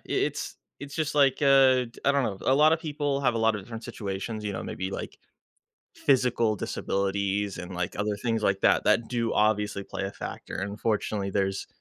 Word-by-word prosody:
it's - - -2 0.2
it's 140 +1 -8
just 155 -1 -1
like, 140 -3 +4
uh, 135 -2 +6 0.2
I 140 - +5
don't 140 -2 +2
know. 100 -4 -2
A 130 - +3
lot 155 +2 +6
of 160 - +1
people 145 -3 -2
have 125 -4 +2
a - - 0
lot 110 0 +3
of 105 - -4
different 115 +2 -8
situations, 110 -1 -5
you 105 - -2
know, - - -5
maybe, 95 0 -4
like, - - -6 0.8
physical 125 -5 +2
disabilities 100 +1 -1
and, 90 +1 -7
like, 90 -1 -3
other 105 0 -1
things 115 0 -1
like 100 -1 +2
that, - - +4
that 115 - +3
do 115 -2 -1
obviously 105 -2 +1
play 95 - -5
a 95 - -3
factor. - - -7
Unfortunately, 100 0 -2
there's 95 0 -1
110 Hz, 195 wpm, -27 LUFS, 100-130 Hz, 0.8 s, uh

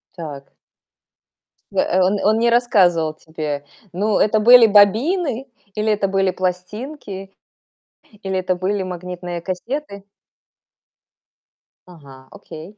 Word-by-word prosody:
Так. 145 -5 -9 1.2
Э - - +1
э, 185 - +1
он 190 +3 +2
он 215 +2 +3
не 235 - +3
рассказывал 185 -10 +2
тебе 155 -3 -6 0.3
ну, 205 +3 0
это 215 +1 +2
были 240 +1 +8
бобины, 240 - +2 0.3
или 215 0 0
это 205 -1 0
были 195 -1 +1
пластинки, 195 +3 -5 0.9
или 190 -1 -2
это 185 0 -1
были 190 +2 -2
магнитные 180 -1 -6
кассеты? 200 - -5 1.8
Ага, 140 -7 -15
окей, 190 0 -12
195 Hz, 110 wpm, -20 LUFS, 175-215 Hz, 1.8 s, были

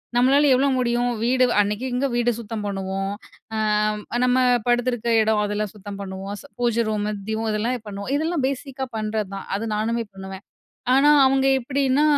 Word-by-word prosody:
நம்மளால 270 +4 +4
எவ்ளோ 275 +2 +2
முடியும்? 240 0 +1
வீடு 255 +1 +3 0.2
அன்னைக்கிங்க 245 +6 -1
வீடு 240 0 +2
சுத்தம் 215 -1 -5
பண்ணுவோம். 195 0 -3 0.4
ஆ, - - -1 0.7
நம்ம 250 0 +3 0.3
படுத்துருக்க 240 -1 +1
இடம் 215 -1 +2
அதெல்லாம் 210 -1 -2
சுத்தம் 200 0 -8
பண்ணுவோம். 195 +1 -6 0.3
பூஜை 235 -1 +2
ரூமு, 210 -1 -1 0.2
தீபம் 220 0 -1
இதெல்லாம் 225 +2 -2
பண்ணுவோம். 200 +5 -5
இதெல்லாம் 315 -1 0
பேஸிக்கா 270 -1 -4
பண்றதான். 215 -2 -3
அது 220 +3 -3
நானுமே 230 +2 -1
பண்ணுவேன். 190 0 -9 0.5
ஆனா 280 +2 +5 0.2
அவுங்க 270 0 +3
எப்பிடின்னா, 275 +2 +1
230 Hz, 145 wpm, -23 LUFS, 205-255 Hz, 0.7 s, ஆனா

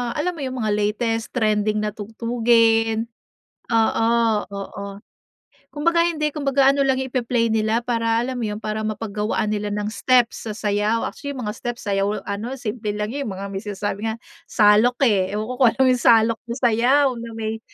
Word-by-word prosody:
alam 335 +4 0
mo - - -10
yung 260 -1 -4
mga 215 - 0
latest 220 +2 -1
trending 215 -2 +1
na 210 - -1
tugtugin? 225 +1 +1 0.7
Oo, 225 0 +2 0.4
oo. 200 0 -6 0.8
Kumbaga 335 +3 +1
hindi, 305 -3 -1
kumbaga 275 -2 +3
ano 280 - -1
lang 265 -1 +2
yung 265 -1 -4
ipe-play 235 -2 0
nila 220 +2 +1
para 230 -1 0
alam 255 0 -4
mo - - -2
yun, 210 0 -3
para 215 0 -3
mapaggawaan 215 0 -2
nila 210 0 -2
ng 210 0 -2
steps 245 -2 +1
sa - - -3
sayaw. 210 +2 0
Actually, 285 -1 -6
yung 255 - -5
mga 210 - -2
steps 240 +1 -5
sa 200 - 0
sayaw 200 +2 -1
ano, 210 +6 -4
simple 225 -3 -5
lang 210 +1 -2
yun, 280 +1 -3
yung 195 - -4
mga 195 +1 -5
may 195 - -3
sinasabi 205 0 -3
nga, 220 - -3 0.3
"salok," 215 +3 +4
eh. 200 -6 +2
Ewan 215 - -2
ko - - -3
kung 250 - +7
alam - - -11
mo - - +4
yung 250 - -1
salok 225 -1 +4
na 235 - -3
sayaw, 250 +3 +3
na 230 0 -7
may 220 0 -4
225 Hz, 195 wpm, -22 LUFS, 210-245 Hz, 0.8 s, kung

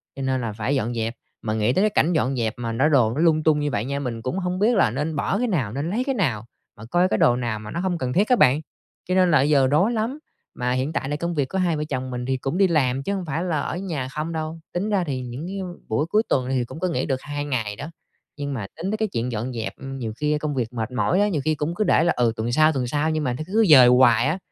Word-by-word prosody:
cho 135 - -6
nên 130 -1 0
là 115 -3 -3
phải 115 +6 -1
dọn 120 -2 -1
dẹp, 115 0 -2 0.3
mà 110 - -2
nghĩ 110 +2 +1
tới 190 - +2
cái 215 - +4
cảnh 180 -4 +2
dọn 135 -4 +1
dẹp 115 -3 -1
mà 115 -1 -3
nó 130 +7 +2
đồ 125 -7 +3
nó 145 - -1
lung 160 -2 +3
tung 155 -1 +3
như 145 0 -1
vậy 110 -2 -1
nha, 140 +1 -2
mình 120 -5 -4
cũng 130 +11 -2
hông 180 0 -2
biết 225 +4 +3
là 155 - +3
nên 150 +6 -2
bỏ 150 +7 0
cái 245 +3 0
nào, 145 - -1
nên 140 +5 -2
lấy 225 +7 0
cái 270 0 -1
nào, 125 - -1 0.3
mà 105 - -10
coi 175 +10 +2
cái - - 0
đồ 120 - +4
nào 120 -3 -2
mà 105 0 -9
nó 170 - -3
hông 180 -1 -1
cần 130 -5 -2
thiết 200 +5 +3
á 250 - +6
bạn, 140 - +4 0.5
cho 185 - +2
nên 185 -2 +4
là 155 - +6
bây 140 +3 +2
giờ 140 -3 +4
rối 175 - +3
lắm. 230 +6 -2 0.4
Mà 125 0 -1
hiện 130 +5 -1
tại 135 - -2
là 145 - -1
công 170 +3 -3
việc 140 -3 0
của 190 - -3
hai 175 -4 +1
vợ 150 - -2
chồng 130 -1 -3
mình 125 0 -4
thì 130 +1 0
cũng 135 +6 -3
đi 195 0 +5
làm 135 -6 +1
chứ 200 - -2
hông 190 -2 -4
phải 160 +2 -2
là 170 -5 -1
ở - - -3
nhà 165 -9 -3
không 155 +4 -4
đâu, 160 0 -4
tính 190 +4 -1
ra 200 -3 +1
thì 135 -6 -3
những 125 +6 -6
cái 195 +1 -5 0.3
buổi 140 +7 +1
cuối 210 +6 +2
tuần 130 -1 +1
thì 130 -2 0
cũng 155 - -9
có 185 - 0
nghỉ 165 - -1
được 130 -2 -2
2 145 0 -4
ngày 115 -7 -2
đó, 145 +6 -7 0.5
nhưng 145 -1 -3
mà 110 -7 -4
tính 180 +5 -3
tới 215 - -1
cái 220 0 0
chuyện 120 +2 -1
dọn 120 +3 -3
dẹp, 115 -2 -4
ừm, 135 0 -7
nhiều 115 -3 -4
khi 150 +2 +1
công 150 -1 -3
việc 120 -2 -2
mệt 115 0 -3
mỏi 165 +8 +1
đó, 205 - +4
nhiều 180 -9 -1
khi 155 0 +2
cũng 150 +3 -3
cứ 215 - +1
để 185 - +3
là, 170 - +2
ừ, 120 -2 +2
tuần 110 +2 -2
sau, 155 +4 +4
tuần 130 -3 -1
sau 150 +4 0
nhưng 155 -1 -1
mà 125 -3 0
nó 130 - -5
cứ 220 +4 +3
dời 130 -5 +9
hoài 125 -1 +5
á, 160 - 0
145 Hz, 310 wpm, -23 LUFS, 125-170 Hz, 0.5 s, dời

